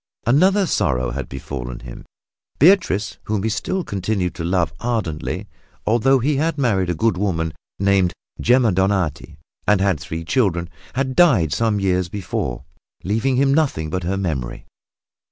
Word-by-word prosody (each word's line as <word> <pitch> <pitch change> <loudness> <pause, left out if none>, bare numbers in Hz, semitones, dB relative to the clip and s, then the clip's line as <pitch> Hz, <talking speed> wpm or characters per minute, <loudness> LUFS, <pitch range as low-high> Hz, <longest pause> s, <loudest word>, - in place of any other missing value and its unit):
Another 185 - +4
sorrow 65 - 0
had 70 +3 -5
befallen 65 -2 -6
him. - - -10 0.5
Beatrice, 160 - +3
whom 105 -2 -1
he 110 - +1
still 185 - -2
continued 95 - -2
to 85 - -6
love 85 -3 0
ardently 110 -11 -2 0.4
(although 120 +5 +4
he 135 +3 +1
had 160 +2 0
married 100 -10 +1
a 90 - 0
good 110 +2 +1
woman 80 -5 -1 0.2
named 100 -2 +3 0.3
Gemma 120 -1 +4
Donati 90 -5 0 0.3
and 105 -1 +4
had 95 -5 +1
three 80 +2 -6
children) 90 -6 0 0.2
had 130 0 -1
died 115 - +4
some 110 -3 +1
years 90 -2 +1
before, 90 -10 -4 0.4
leaving 115 +7 0
him 135 +1 +3
nothing 135 - 0
but 90 - -1
her 95 +3 -2
memory. 75 -11 -3
100 Hz, 150 wpm, -21 LUFS, 85-125 Hz, 0.5 s, Another